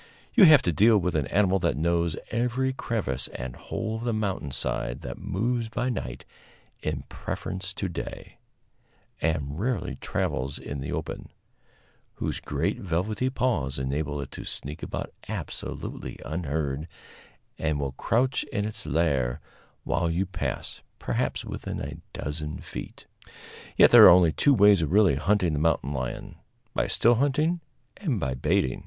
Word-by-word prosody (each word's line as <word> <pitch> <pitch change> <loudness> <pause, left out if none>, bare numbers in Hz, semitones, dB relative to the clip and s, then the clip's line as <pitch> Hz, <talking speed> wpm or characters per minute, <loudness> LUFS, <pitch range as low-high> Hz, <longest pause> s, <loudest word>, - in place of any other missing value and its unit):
You 220 -6 +8
have 155 -3 +8
to 85 - +1
deal 110 +7 +6
with 90 -3 0
an 75 -4 +1
animal 95 0 +3
that 85 -7 0
knows 85 0 +1
every 125 +3 0
crevice 95 - -1
and 60 0 -5
hole 110 0 -4
of 115 - -6
the 120 -1 0
mountain 100 -9 -2
side, - - -2
that - - -6
moves 115 +3 -1
by 125 +3 -1
night 65 - -4 0.6
in - - -2
preference 95 0 -5
to 95 - -2
day, 85 - -7 0.8
and 75 -2 -1
rarely 115 -3 -1
travels 65 +1 -2
in 70 - -6
the 70 - -4
open; - - -4 0.9
whose - - -3
great - - -1
velvety 100 +8 -1
paws 90 - 0
enable 70 +2 -2
it 70 - -6
to - - -7
sneak 75 +4 -6
about - - -5 0.2
absolutely - - -5
unheard, 75 -2 -2 0.7
and 80 -2 0
that 70 - -2
will 70 - -2
crouch 125 - +1
in 105 -2 -2
its 110 0 -6
lair 70 -7 +1 0.4
while 85 - 0
you 85 +4 0
pass, 95 - -4 0.2
perhaps - - -2
within - - -5
a - - -5
dozen 75 +1 -4
feet. - - -8 0.7
Yet - - +8
there - - +11
are - - +12
only 85 -3 +4
two 140 - +4
ways 100 -4 +6
of 80 - -1
really 100 -3 +5
hunting 95 -1 +2
the 75 - 0
mountain 80 -2 +1
lion 65 -2 -4 0.4
by - - +1
still 120 - +4
hunting 155 +5 +2 0.4
and 145 - -1
by 65 -6 -1
baiting. 65 0 +1
85 Hz, 155 wpm, -27 LUFS, 70-110 Hz, 0.9 s, are